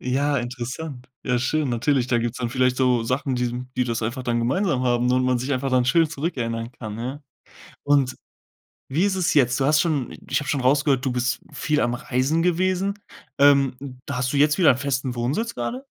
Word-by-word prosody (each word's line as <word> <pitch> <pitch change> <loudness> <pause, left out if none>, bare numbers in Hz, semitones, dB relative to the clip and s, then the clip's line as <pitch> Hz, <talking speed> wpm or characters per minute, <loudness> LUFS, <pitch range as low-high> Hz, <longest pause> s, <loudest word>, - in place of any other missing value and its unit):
Ja, 140 +3 0
interessant. 125 +3 -6 0.2
Ja, 125 -1 +1
schön. 145 +4 0
Natürlich, 125 +2 +1
da 120 -2 +1
gibt's 120 +2 -3
dann 120 -2 -2
vielleicht 125 0 +1
so 125 -3 +2
Sachen, 130 +3 -1
die 125 0 -2
die 125 - +2
das 115 -2 -2
einfach 125 +4 -3
dann 120 -1 0
gemeinsam 135 - 0
haben 125 0 +2
und 130 0 +2
man 125 -1 +2
sich 130 +4 -2
einfach 135 +1 -1
dann 130 -1 +3
schön 165 +4 +4
zurückerinnern 120 -7 -3
kann, 110 -3 -7
ja. 130 +5 -5 0.6
Und 140 -3 +2 0.7
wie 155 +8 +1
ist 200 -1 +1
es 180 - +1
jetzt? 125 -3 +3
Du 135 - +1
hast 150 +2 +4
schon 150 -8 -1 0.2
ich - - +2
habe 145 - -7
schon 140 -1 0
rausgehört, 135 0 +2
du 130 - 0
bist 125 +1 -1
viel 150 -1 0
am 120 0 +1
Reisen 135 +5 0
gewesen. 185 +3 0 0.4
Ähm, 140 -2 +5 0.3
da 140 - -4
hast 125 0 -1
du 145 - -1
jetzt 150 +4 +3
wieder 160 -9 +5
festen 130 -2 -2
Wohnsitz 150 - -1
grade? 255 +3 -4
130 Hz, 205 wpm, -23 LUFS, 125-145 Hz, 0.7 s, Ähm